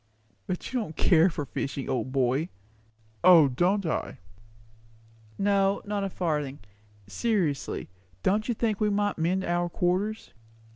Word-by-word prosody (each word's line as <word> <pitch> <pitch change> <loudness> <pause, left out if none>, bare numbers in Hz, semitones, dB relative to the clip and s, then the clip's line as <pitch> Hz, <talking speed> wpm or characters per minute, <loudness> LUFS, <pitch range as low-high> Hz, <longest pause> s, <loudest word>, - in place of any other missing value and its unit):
"But 180 +7 -4
you 255 - +1
don't 160 -9 -5
care 170 +1 +4
for 150 -4 -4
fishing, 135 0 -4
old 130 0 -2
boy." 135 +5 +1 0.7
"O, 170 -5 +8
don't 180 +9 +1
I!" 160 - -2 1.2
"No, 195 0 +2
not 205 -1 -2
a 195 - -1
farthing. 150 -7 -2 0.5
Seriously, 165 - -1 0.4
don't 210 +3 +1
you 240 - 0
think 220 -2 -1
we 210 - +3
might 205 -2 0
mend 180 +4 +1
our 175 0 0
quarters?" 185 +6 -1
180 Hz, 135 wpm, -27 LUFS, 150-205 Hz, 1.2 s, O